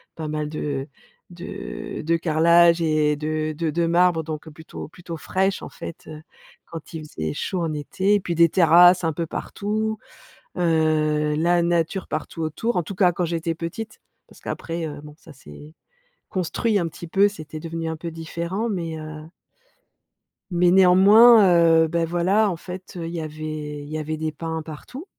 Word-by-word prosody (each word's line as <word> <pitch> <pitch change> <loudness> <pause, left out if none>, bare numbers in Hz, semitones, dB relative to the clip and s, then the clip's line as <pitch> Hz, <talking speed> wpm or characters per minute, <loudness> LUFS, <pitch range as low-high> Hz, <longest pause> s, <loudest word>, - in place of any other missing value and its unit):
pas 160 -1 -5
mal 150 0 -3
de 145 -2 -4 0.4
de 195 +3 -7
de 165 +2 +1
carrelages 170 +1 +4
et 155 -2 +2
de 155 +1 -2
de 160 0 -2
de 170 +1 0
marbre 170 -1 +3
donc 155 0 -6
plutôt 160 +1 -10
plutôt 170 0 -9
fraîche, 190 +5 -1
en - - -7
fait, 165 - -9
heu, 155 -1 -9 0.4
quand 165 0 -10
il 155 -1 -7
faisait 80 - -4
chaud 185 - -3
en 160 -2 -2
été. 190 +7 0
Et - - +2
puis, 170 - -3
des 170 0 +5
terrasses, 175 +1 +6
un 160 - 0
peu 165 +3 -3
partout, 215 +5 -3 0.6
heu, 155 -3 +1
la 170 +2 +2
nature 170 +2 0
partout 155 +1 -4
autour. 160 +10 -2
En 180 - +2
tous 195 - -7
cas, 185 -3 +4
quand 175 - -2
j'étais 165 0 -2
petite, 170 +7 -6 0.3
parce - - -18
qu'après, 165 0 -4
heu, 145 -2 -7
bon 150 0 -12
ça 160 - -15
c'est 140 - -14 0.6
construit 205 +3 0
un 170 - -1
petit 170 +1 -10
peu, 195 +4 +4
c'était 155 -5 -9
devenu 165 0 -4
un 160 - -3
peu 170 +1 -6
différent 170 +6 -4
mais 165 -5 -3
heu 155 0 -8 1.3
mais 175 0 +3
néanmoins, 200 +5 +7 0.4
heu, 160 - +1
bah, 170 +1 0
voilà, 185 +6 +2
en 175 - -3
fait, 180 +1 -9
heu, 165 -1 -4
il 170 - -7
y 170 - -3
avait 155 -1 -6
il 145 - -10
y 155 - -3
avait 155 +1 -3
des 155 0 -2
pins 160 +1 -5
partout. 165 - -9
165 Hz, 180 wpm, -23 LUFS, 155-180 Hz, 1.3 s, néanmoins